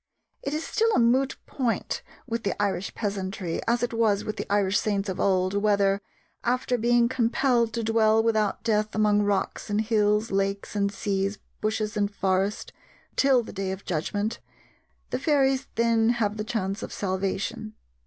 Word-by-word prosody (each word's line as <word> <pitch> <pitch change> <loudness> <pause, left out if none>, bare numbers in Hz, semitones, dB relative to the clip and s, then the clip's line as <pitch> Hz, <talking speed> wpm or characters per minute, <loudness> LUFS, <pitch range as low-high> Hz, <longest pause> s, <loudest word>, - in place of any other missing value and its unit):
It 280 +2 -3
is 315 - -3
still 455 +1 +1
a - - +4
moot 255 +3 +3
point 245 -4 -2 0.2
with 230 0 -3
the 200 - -2
Irish 195 -2 -1
peasantry, 195 -4 -3
as 240 +1 +2
it 240 - -1
was 220 -3 +2
with 215 - -4
the - - -5
Irish 200 -1 +3
saints 200 -2 -1
of 185 - -4
old, 185 -1 +2
whether, 200 -1 +2 0.4
after 250 +1 +1
being 240 0 +3
compelled 240 -1 +2
to 230 0 -2
dwell 220 0 +3
without 220 -3 +1
death 215 -1 0
among 210 -1 +3
rocks 205 0 -1
and 205 0 +1
hills, 215 0 +2
lakes 195 +1 -1
and 200 -1 +1
seas, 200 0 -1 0.2
bushes 215 0 -1
and 205 -1 +1
forest, 195 0 -1 0.4
till 265 -3 +4
the - - -9
day 195 -1 -2
of 190 +1 -7
judgment, 205 +7 -2 0.7
the - - -1
fairies 270 -2 +2
then 230 -1 +3
have 210 -2 0
the 215 - -3
chance 215 -3 -2
of - - -6
salvation. 195 +2 -3
215 Hz, 165 wpm, -26 LUFS, 200-235 Hz, 0.7 s, a